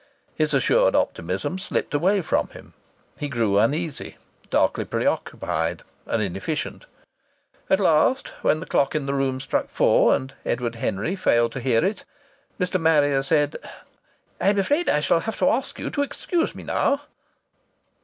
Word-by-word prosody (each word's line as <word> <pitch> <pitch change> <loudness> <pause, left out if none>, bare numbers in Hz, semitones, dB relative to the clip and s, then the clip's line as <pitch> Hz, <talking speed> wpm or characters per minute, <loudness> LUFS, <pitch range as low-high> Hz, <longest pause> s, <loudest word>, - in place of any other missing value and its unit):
His 155 -1 0
assured 135 - +3
optimism 95 - -1
slipped 190 - -3
away 185 +6 +2
from - - 0
him. - - -14 0.5
He 145 - -3
grew 110 -6 +1
uneasy, 150 +7 -1 0.3
darkly - - +2
preoccupied, 80 +2 -2 0.2
and 110 - 0
inefficient. 100 - -4 0.8
At 190 - +4
last, 185 - +3
when 155 - +2
the - - -6
clock 140 +2 +1
in 150 -2 -1
the 140 - -1
room 135 -1 0
struck 135 - -2
four, - - +4
and 130 0 -5
Edward 120 -1 -2
Henry 115 - -2
failed 120 -11 +2
to 135 - -5
hear 125 +2 +2
it, 200 +2 -2 0.6
Mr. 180 -1 0
Marrier 145 -4 +3
said: 145 +1 +1 0.8
"I'm 200 +1 +2
afraid 290 - +1
I 150 - +2
shall 160 +3 +3
have 220 +5 -4
to 185 - +3
ask 260 +3 -2
you - - -4
to 285 - -1
excuse 330 +4 -1
me - - -9
now." 280 - +1
150 Hz, 155 wpm, -23 LUFS, 120-185 Hz, 0.8 s, At